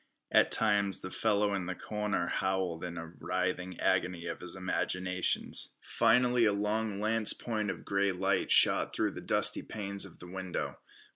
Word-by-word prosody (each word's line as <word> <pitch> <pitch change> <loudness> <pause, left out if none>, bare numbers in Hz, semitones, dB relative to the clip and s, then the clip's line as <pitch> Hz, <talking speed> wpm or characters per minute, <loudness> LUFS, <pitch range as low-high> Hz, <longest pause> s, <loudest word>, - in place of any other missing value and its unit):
At - - +4
times 100 -3 +1
the 95 - -7
fellow 105 -2 +1
in 95 -3 -2
the 90 - -3
corner 105 -4 -2
howled 95 -3 -1
in 85 -1 -5
a 80 0 -7
writhing 90 0 -2
agony 90 -2 0
of 85 - -4
his 90 - -8
imaginations. 90 -1 -1
Finally 125 0 +3
a 105 - +3
long 105 0 -1
lance 110 0 +4
point 110 -3 -3
of - - -6
grey 100 0 +1
light 95 +1 0
shot - - +4
through - - +1
the - - -8
dusty - - +2
panes 100 -2 -3
of 100 -4 -9
the - - -12
window. 95 0 -5
95 Hz, 165 wpm, -31 LUFS, 90-105 Hz, -, At